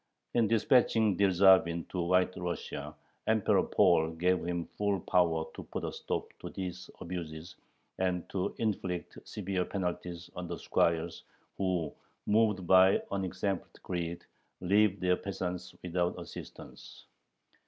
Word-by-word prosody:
In 115 -2 +3
dispatching 115 -2 +3
Dyerzhavin 95 -3 +4
to 90 - -2
White 90 +1 +2
Russia, 90 -1 -5 0.3
Emperor 110 -2 +3
Paul 80 0 +3
gave 90 +2 +1
him 85 -1 -2
full 100 -2 0
power 85 -4 +2
to - - -7
put - - -5
a - - -2
stop - - -3
to - - -7
these 90 -1 -6
abuses 85 -2 -6 0.4
and 90 -2 0
to 95 -2 -2
inflict 95 -5 -2
severe 95 -2 -2
penalties 90 -2 -4
on 90 -1 -5
the 85 0 -4
squires, 85 0 0 0.3
who, 90 -6 -1 0.3
"moved 105 -3 +2
by 95 +2 +6
unexampled 95 0 -3
greed, 85 -1 -4 0.3
leave 100 +1 +3
their 90 0 +2
peasants 90 -2 -5
without 90 0 -1
assistance." - - -10
90 Hz, 125 wpm, -31 LUFS, 85-95 Hz, 0.4 s, by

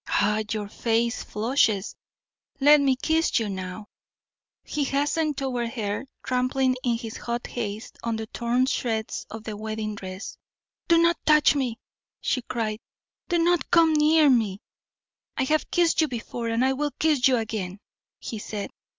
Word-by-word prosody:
Ah! 210 +1 +2
your 210 -2 -2
face 230 +2 0
flushes. 220 -2 0 0.6
Let 295 +1 +7
me 270 -2 +3
kiss 320 +5 +1
you 225 -4 0
now." 190 +1 -5 0.8
He 295 - -2
hastened 290 +2 0
toward 245 -4 -2
her, 210 +1 -3 0.2
trampling 255 +1 +1
in 235 -2 +1
his 225 -2 -7
hot 235 0 -4
haste 220 -2 -5
on 230 -1 -1
the 220 0 -4
torn 240 +3 0
shreds 225 -4 -2
of 220 0 -8
the 220 -1 -5
wedding 215 0 -4
dress. 190 -1 -7 0.5
"Do 335 - +5
not 335 +1 +3
touch 300 -1 +6
me!" 255 -5 -1 0.4
she 255 - 0
cried. 220 -3 -3 0.5
"Do 350 - +2
not 345 0 +2
come 330 -2 +5
near 305 0 +5
me!" 220 -7 +2 0.7
"I - - +2
have 305 +4 0
kissed 340 -2 +3
you 315 - +3
before, 240 -2 -5
and 230 +3 +2
I 265 - +2
will 295 +2 -1
kiss 300 -5 +3
you 255 -2 +3
again," 205 -4 -4 0.4
he 220 - -6
said. 205 -1 -5
240 Hz, 160 wpm, -25 LUFS, 220-285 Hz, 0.8 s, Let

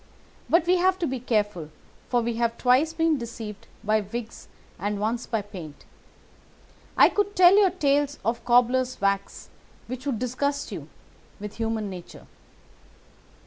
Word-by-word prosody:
But 335 0 +4
we 365 +1 +4
have 370 +1 +3
to 350 - -1
be 265 -3 -2
careful, 210 -9 -1 0.4
for 245 -1 +2
we 230 0 -2
have 230 -1 0
twice 260 +6 +3
been 325 -2 +1
deceived 225 -3 -8 0.2
by 215 +1 +2
wigs 225 +3 -7 0.3
and 205 +2 -2
once 225 +3 -2
by 225 -3 -1
paint. 180 -8 -10 1.1
I - - +8
could 410 0 -1
tell 365 +1 +7
you 405 -2 +6
tales 290 -4 +1
of 230 +1 -1
cobbler's 250 +1 +2
wax 200 0 -1 0.4
which 255 +3 -6
would 260 -5 0
disgust 280 +4 -2
you - - -7 0.5
with 210 0 -8
human 225 -2 -2
nature. 180 -2 -10
240 Hz, 145 wpm, -25 LUFS, 215-285 Hz, 1.1 s, I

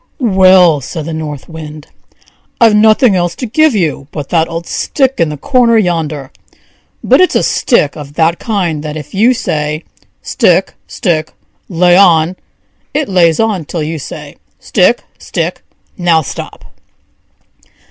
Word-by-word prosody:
"Well!" 185 -5 +5
said 155 +3 -6
the 165 - -5
North 150 -3 -6
Wind; 155 -2 -9 0.7
"I've 225 -2 +5
nothing 215 +1 +4
else 175 -1 -1
to 250 - -5
give 290 +3 +2
you 155 -7 -1
but 145 -3 -6
that 165 -1 +1
old 165 0 -5
stick 270 - -1
in 165 -2 +2
the 150 - -6
corner 240 - +2
yonder; 155 -8 -2 0.7
but - - +4
its 370 - +2
a - - +2
stick 195 - +1
of 145 -1 -10
that 165 +1 +1
kind 180 -9 -2
that 155 0 -6
if 150 -1 -10
you 230 +6 +3
say: 150 -8 -3 0.4
'Stick, - - +1
stick! 160 -7 -2 0.4
lay 175 0 +3
on!' 175 -2 +4 0.6
it 295 -5 -1
lays 170 -4 +3
on 215 -6 0
till 160 +1 -4
you 160 +1 -4
say: - - -9 0.2
'Stick, - - +1 0.2
stick! - - -4 0.4
now 170 -3 +2
stop!'" - - -8
170 Hz, 145 wpm, -12 LUFS, 155-205 Hz, 0.7 s, Well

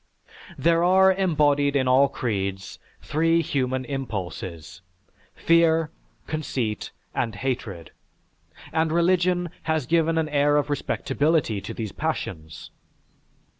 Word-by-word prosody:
There 165 +1 +3
are 190 +1 +5
embodied 145 -6 +2
in 130 -2 +2
all 130 +2 +5
creeds 100 -7 -3 0.2
three 165 +2 +2
human 130 -3 -1
impulses: 95 - -6 0.5
fear, 165 -1 +3 0.3
conceit, 130 -8 -3 0.2
and 115 -3 -2
hatred; 105 -8 -4 0.8
and 160 0 +1
religion 175 0 +2 0.2
has 160 -4 +1
given 165 +2 +2
an 160 -1 +1
air 145 0 +3
of 145 0 0
respectability 145 -4 0
to - - -7
these 110 -3 -4
passions. 80 0 -5
145 Hz, 105 wpm, -24 LUFS, 115-165 Hz, 0.8 s, are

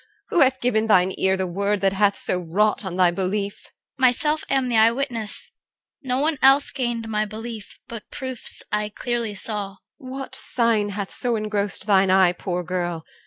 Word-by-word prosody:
Who - - +1
hath 265 -2 +3
given 225 -3 +1
thine 185 -3 +3
ear 190 0 +2
The 190 - -2
word 200 +3 -2
that 195 -1 +2
so 195 - -7 0.4
hath 175 - -10
wrought 210 +5 +1
on 185 -2 -5
thy 180 -2 +4
belief? 200 +3 -3
CHR. 270 - -22
Myself 300 +5 +3
am 270 -2 +1
the 240 - -1
eyewitness, 230 0 +3 0.5
no 255 -2 -2
one 295 +1 0
else 270 +1 +5
Gained 240 -4 -3
my 215 -1 -1
belief, 220 0 -8
but 230 -3 -9
proofs 260 -3 -1
I 210 0 -1
clearly 235 -1 -3
saw. 205 -1 +3
EL. - - -24 0.2
What 265 -1 -8
sign 230 -5 0
hath 200 -1 -6
so 245 -2 -2
engrossed 210 -2 -3
thine 195 -2 +3
eye, 185 -1 +4
poor 180 0 -4
girl? 175 -2 -4
215 Hz, 180 wpm, -22 LUFS, 195-245 Hz, 0.5 s, else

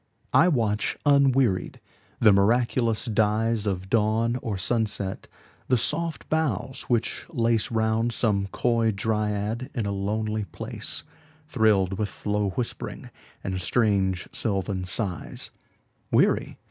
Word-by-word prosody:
I 175 - +6
watch, 110 -10 0
unwearied, 135 -8 +3 0.4
the 110 -3 +6
miraculous 115 +3 +2
dyesOf 105 -3 0
dawn 115 +2 +2
or 105 -4 -3
sunset; 105 -1 -1 0.4
the 125 - +3
soft 165 +7 -2
boughs 135 - -1
which 120 -2 -1
laceRound 115 -3 +1
some 105 -4 +1
coy 115 +2 +1
dryad 105 +3 -1
in 115 -4 -1
a 100 - -1
lonely 105 +2 -2
place, - - -4 0.4
Thrilled 105 - +2
with 105 -1 -4
low 105 -1 +1
whispering 115 +5 -5 0.3
and 95 -1 -3
strange 95 -4 +1
sylvan 95 -3 -2
sighs:Weary? 90 -2 -2
110 Hz, 105 wpm, -26 LUFS, 100-120 Hz, 0.4 s, I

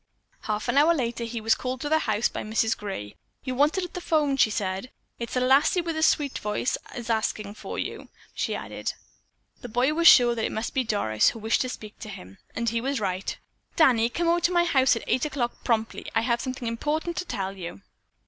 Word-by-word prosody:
Half 210 +1 -2
an 255 +3 +4
hour 330 +3 +5
later 235 -4 -2
he 230 0 -4
was 225 +1 +3
called 255 0 -3
to 295 - -2
the 315 +1 +4
house 215 -5 +1
by - - -5
Mrs. 220 +1 +1
Gray. 190 - -6 0.3
"You're 255 -1 -3
wanted 300 +8 +2
at 355 - -6
the 360 - -5
phone," 300 -5 +2
she 245 - +4
said. 195 +2 -3 0.3
"It's 235 +1 -5
a - - +3
lassie 270 +7 +4
with 335 -1 -3
a 315 - -1
sweet 290 -3 +2
voice 210 +4 -1
as 245 - -6
is 235 - -9
askin' 215 -2 -1
for - - -7
you," - - -5 0.2
she - - -2
added. - - -4 0.7
The 245 - -7
boy 250 +6 +2
was 335 +2 +4
sure 245 -6 +8
that 225 -1 -3
it - - -2
must 220 +2 -3
be 260 - +1
Doris 200 - +2
who - - -7
wished 220 +1 +1
to 255 - -1
speak 215 -3 -9
to 215 - -8
him, 95 - -11 0.2
and 235 - -2
he 230 +1 -1
was 270 +1 -1
right. 190 -2 -2 0.4
"Danny, 240 -7 +4
come 340 +7 -1
over 340 +1 +3
to 345 - +2
my 345 -1 +4
house 265 -7 +4
tonight 230 - -3
at - - +1
eight 255 - +1
o'clock 265 -5 -3
promptly. 225 -2 -1
I 225 - +4
have 235 0 0
something 255 -2 -4
important 300 +9 -2
to 365 - -2
tell 195 - -3
you." 170 - -8
240 Hz, 235 wpm, -26 LUFS, 220-285 Hz, 0.7 s, sure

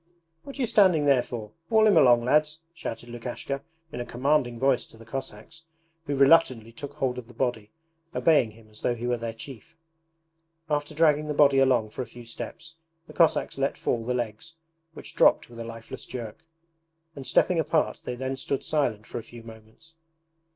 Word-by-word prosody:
'What 275 - -10
are - - -3
you - - +3
standing 190 -9 +4
there 135 -3 +5
for? 115 -3 -7 0.2
Haul 220 -1 +5
him 210 -3 +5
along, 120 -6 +6
lads!' 150 +3 +2
shouted 120 -7 -6
Lukashka 120 +3 -5 0.3
in - - -6
a - - -2
commanding 125 0 +1
voice 135 +1 +2
to - - -16
the 115 - -14
Cossacks, 135 +5 -7 0.5
who 145 - -1
reluctantly 135 -5 +4
took 145 +4 -8
hold 130 -4 -1
of 120 - -11
the 120 - -16
body, 115 -4 -2 0.5
obeying 150 -8 +4
him 110 0 -17
as 105 - -12
though 120 - 0
he 120 +1 -6
were 120 0 0
their 115 0 -3
chief. 140 +8 -11 0.9
After 150 +1 -1
dragging 150 -1 +3
the 150 - -2
body 140 -2 +5
along 125 -5 +3
for 130 - -5
a 125 - -5
few 120 +1 -12
steps 165 +7 -8 0.3
the - - -13
Cossacks 165 -4 +2
let 135 +1 0
fall 115 -2 -1
the 125 +2 -1
legs, 120 +7 -4 0.4
which - - -10
dropped - - +4
with 115 - -11
a - - -4
lifeless 115 +3 -9
jerk, 115 -4 -7 0.8
and 135 -2 -7
stepping 180 -3 +3
apart 160 0 0
they 125 - -4
then 130 +2 -3
stood 135 +1 -3
silent 125 -9 -1
for - - -5
a - - -9
few 115 +1 -12
moments. 110 +8 -15
130 Hz, 195 wpm, -26 LUFS, 115-150 Hz, 0.9 s, along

